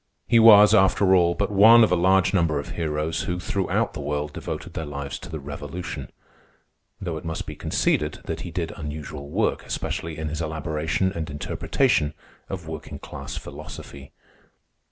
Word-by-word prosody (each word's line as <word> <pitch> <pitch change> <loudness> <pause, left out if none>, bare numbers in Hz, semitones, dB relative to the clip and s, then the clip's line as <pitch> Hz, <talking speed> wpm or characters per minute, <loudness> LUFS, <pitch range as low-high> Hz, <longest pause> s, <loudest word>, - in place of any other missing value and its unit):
He 115 - +5
was, 105 -2 +8
after 95 -2 +4
all, 85 -2 +4
but 100 0 -1
one 110 +4 +8
of 110 - +3
a - - +5
large 95 +2 +3
number 85 -5 +2
of 70 - -6
heroes 80 -1 -2
who, 90 0 -2
throughout 95 +1 -1
the - - -6
world, 75 +1 -3
devoted - - -6
their 80 - -4
lives 70 -1 -5
to - - -10
the 80 -1 -5
Revolution; 75 +4 -6 0.9
though 85 -4 -4
it 80 - -8
must 80 -1 -4
be - - -7
conceded 75 0 0
that - - -4
he - - -6
did 85 -2 -3
unusual 75 -2 -7
work, - - 0
especially 80 -1 -4
in 80 0 -3
his 80 +2 -4
elaboration 80 +3 -1
and 80 -2 -4
interpretation 75 0 0 0.3
of 90 -4 -6
working 80 -1 -7
class - - -8
philosophy. 70 0 -9
80 Hz, 170 wpm, -24 LUFS, 75-95 Hz, 0.9 s, was